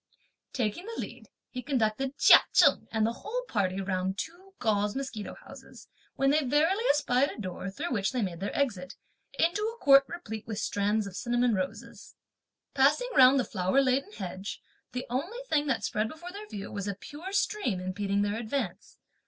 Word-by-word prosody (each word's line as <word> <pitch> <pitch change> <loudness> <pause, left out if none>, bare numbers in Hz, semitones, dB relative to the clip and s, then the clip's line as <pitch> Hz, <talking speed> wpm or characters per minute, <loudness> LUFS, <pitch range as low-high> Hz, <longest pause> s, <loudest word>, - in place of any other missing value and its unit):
Taking 250 - -2
the 460 - -6
lead, - - -7 0.2
he 250 - -5
conducted 260 +1 -1
Chia - - +9
Cheng - - +5
and 220 -1 +1
the 230 - 0
whole - - -3
party 195 -3 0
round 190 0 -2
two 370 - -7
gauze 210 -2 0
mosquito 260 -6 -5
houses, - - -13 0.3
when 275 0 +3
they 305 +1 +3
verily 315 - +2
espied 280 -2 +3
a - - -9
door 185 -1 -5
through 300 - -5
which 200 -5 0
they 250 -3 -1
made 175 -4 -4
their 200 - -3
exit, 205 -9 -1 0.4
into 345 +5 +2
a 450 +2 -2
court, 275 -7 +6
replete 225 -10 -7
with 220 -2 -4
stands 210 0 0
of 195 -2 -8
cinnamon 240 +1 +1
roses. 185 -2 -5 0.6
Passing - - +3
round 260 +1 +7
the 250 - 0
flower 185 +5 +1
laden 270 +7 +1
hedge, 190 +1 -6 0.3
the 250 0 -4
only 300 - -3
thing 300 -5 +1
that 265 -4 0
spread 215 +1 0
before 345 +5 -9
their 415 +2 -9
view 200 -1 -6
was 200 -1 -4
a 200 - -2
pure 300 - -9
stream 395 - 0
impeding 200 +2 -1
their 205 +2 -1
advance. 230 -4 -4
245 Hz, 180 wpm, -29 LUFS, 200-295 Hz, 0.6 s, Chia